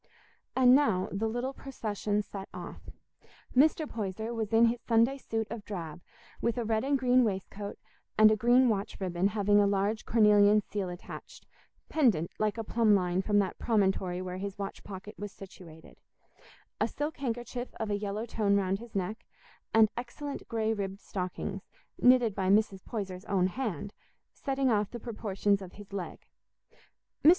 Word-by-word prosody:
And 255 -1 +6
now 220 -10 +3
the 215 +3 -1
little 245 +4 -2
procession 210 -6 -2
set 195 -1 -8
off. - - -9 0.7
Mr. 305 +3 +4
Poyser 220 +1 -4
was 220 -3 -3
in 225 +1 +6
his 230 +1 +1
Sunday 235 +4 +2
suit 225 -3 -2
of 230 -2 -5
drab, 175 -5 -6 0.4
with 235 +1 0
a 240 - -1
red 220 0 +1
and 280 +1 +2
green 255 -1 +4
waistcoat 200 -1 -3 0.4
and 215 0 +8
a - - +4
green 245 +4 +4
watch 205 -3 -1
ribbon 185 -1 0
having 205 0 +3
a 205 - +4
large 200 +2 0
cornelian 210 -2 +5
seal 200 -3 -3
attached, 175 0 -10 0.4
pendant 220 - +2
like 215 +1 0
a 225 - -2
plumb 220 -1 +3
line 180 -1 +1
from 205 +1 +1
that 195 -3 0
promontory 190 -5 +1
where 180 0 -5
his 195 0 -5
watch 200 -1 -6
pocket 200 +1 -8
was 205 0 -5
situated; 170 -5 -13 0.8
a - - +2
silk 295 +2 -4
handkerchief 245 -1 -4
of 220 -2 -3
a - - +2
yellow 205 +2 -3
tone 210 -3 +1
round 195 -1 +1
his 235 -1 -12
neck; 195 +3 -2 0.5
and 220 -1 +6
excellent 275 +4 -6
grey 220 -1 0
ribbed 195 -2 -4
stockings, 190 +1 -4 0.4
knitted 250 -3 +5
by 190 -1 -1
Mrs. 200 -1 +2
Poyser's 195 -4 -5
own 195 -4 +2
hand, 205 - -3 0.4
setting 270 -2 0
off 210 -2 +1
the 240 - -7
proportions 205 -3 -1
of 185 -2 -9
his 200 -1 -13
leg. 190 -3 -6 1.0
Mr. 305 - +9
210 Hz, 165 wpm, -30 LUFS, 195-235 Hz, 1.0 s, Mr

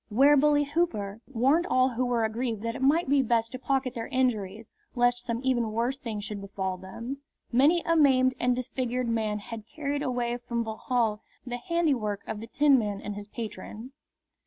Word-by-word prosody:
'Ware 275 +7 +6
Bully 290 +1 +4
Hooper!" 230 -10 -1
warned 275 +8 +2
all 255 -4 +3
who 250 0 -1
were 235 -2 +1
aggrieved 225 -1 -2
that 230 0 -2
it 275 - -6
might 295 +5 +3
be 280 0 +4
best 230 -2 +1
to 255 - -6
pocket 265 -1 0
their 230 -3 -4
injuries 225 -4 -1 0.2
lest 245 0 +3
some 235 -1 -3
even 240 -4 +1
worse 235 +4 0
thing 230 -6 -5
should 205 0 -5
befall 190 -1 -3
them. 230 +9 -7 0.3
Many 290 +8 +4
a 330 - +2
maimed 260 -4 +5
and 245 0 +2
disfigured 250 0 -2
man 220 -2 0
had 215 +1 -8
carried 285 +1 -3
away 245 -3 -1
from 235 -1 -3
Vauxhall 220 -1 -1 0.2
the 245 -1 -4
handiwork 250 - 0
of 220 - -5
the 225 - -8
Tinman 235 -7 +3
and 210 0 -5
his 205 0 -8
patron. 220 +2 -7
245 Hz, 185 wpm, -28 LUFS, 220-265 Hz, 0.3 s, Ware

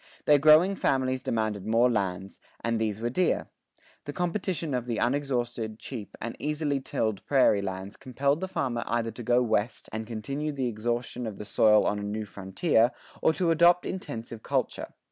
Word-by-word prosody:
Their 145 -1 +6
growing 155 +6 +6
families 130 -5 0
demanded 110 -4 -2
more 115 +2 +4
lands, 95 -4 -2 0.2
and 115 -1 0
these 110 -2 -1
were 120 +1 -2
dear. 180 +7 0 0.5
The 145 - -5
competition 175 -3 -2
of 125 -1 -2
the 115 - -1
unexhausted, 120 -4 -1
cheap, 115 -3 -8
and 115 +1 -5
easily 150 -1 -1
tilled 110 -6 -2
prairie 130 -7 +4
lands 95 +1 -5
compelled 140 +4 -1
the 190 - -2
farmer 125 -10 -2
either 115 -1 -1
to 115 - -9
go 120 +2 +3
west 110 -1 -1
and 110 0 -4
continue 140 +7 -3
the 135 -3 -1
exhaustion 120 +2 -3
of 105 -3 -6
the 105 - -7
soil 105 0 +4
on 105 - 0
a - - -5
new 105 +1 -3
frontier, 105 - +1 0.3
or - - +4
to 170 0 +1
adopt 170 +2 +5
intensive 115 -11 -6
culture. - - -2
120 Hz, 175 wpm, -28 LUFS, 110-140 Hz, 0.5 s, Their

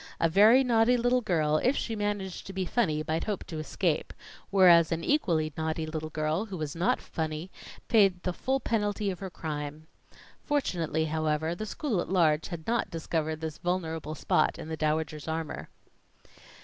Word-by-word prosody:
A 165 - +4
very 215 +9 +6
naughty 240 0 +4
little 245 +1 +2
girl, 155 -8 +1
if 255 - +2
she 225 - -2
managed 205 -3 -3
to 195 - -7
be 190 -1 -2
funny, 165 -8 0
might 160 +1 -1
hope 210 -3 -2
to 160 -3 -6
escape; 155 +1 -1 0.4
whereas 175 -4 +6
an 165 0 -1
equally 165 - +1
naughty 160 0 -2
little 155 0 -4
girl, 155 +5 -1
who 195 -4 -6
was 155 -1 -4
not 170 +3 +1
funny, 160 +2 -4 0.4
paid 195 -5 +4
the 180 - -1
full 265 +8 -1
penalty 210 -4 -1
of 180 - -7
her 195 -1 -5
crime. 150 -2 -5 0.6
Fortunately, 170 - 0
however, 155 +1 0
the 215 +5 -5
school 225 - -1
at - - -6
large 160 -4 +3
had 170 -3 -7
not 235 0 0
discovered 160 -1 -2
this 160 -1 -5
vulnerable 165 -3 -2
spot 155 - +1
in 155 - -8
the 160 - -2
Dowager's 155 0 -1
armor. 160 -1 -4
170 Hz, 175 wpm, -29 LUFS, 155-205 Hz, 0.6 s, very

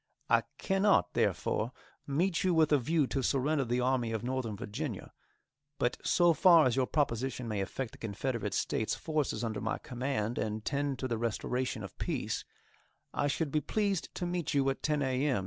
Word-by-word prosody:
I - - +6 0.2
cannot, 195 +1 +2
therefore, 115 +4 0 0.3
meet 170 +6 +1
you 185 -2 +2
with 160 -1 +4
a 145 - +5
view 155 +4 +2
to 135 +1 -1
surrender 140 +3 +1
the 120 +1 0
Army 125 -2 +1
of 110 0 -2
Northern 125 -4 -2
Virginia; 105 -2 -5 0.6
but 120 - 0
so 175 -1 +4
far 170 -1 +7
as 125 -2 +2
your 130 -1 +2
proposition 130 -4 -1
may 105 -3 -1
affect 115 +5 -4
the - - -15
Confederate 105 -1 -2
States 110 - 0
forces 150 -8 -1
under 110 -3 -2
my 110 - -1
command 125 -3 -2
and 110 0 -3
tend 140 -2 -1
to 130 - -2
the 115 -3 -2
restoration 120 +1 -2
of 100 - -8
peace, - - -2 0.7
I 145 - +1
should 145 +1 -1
be 150 - +1
pleased 200 +2 0
to 175 - -2
meet 175 -3 -2
you 135 -1 +3
at 135 - -6
10 150 -1 +1
a. 130 0 0
m. 130 -8 +2
130 Hz, 185 wpm, -31 LUFS, 115-150 Hz, 0.7 s, far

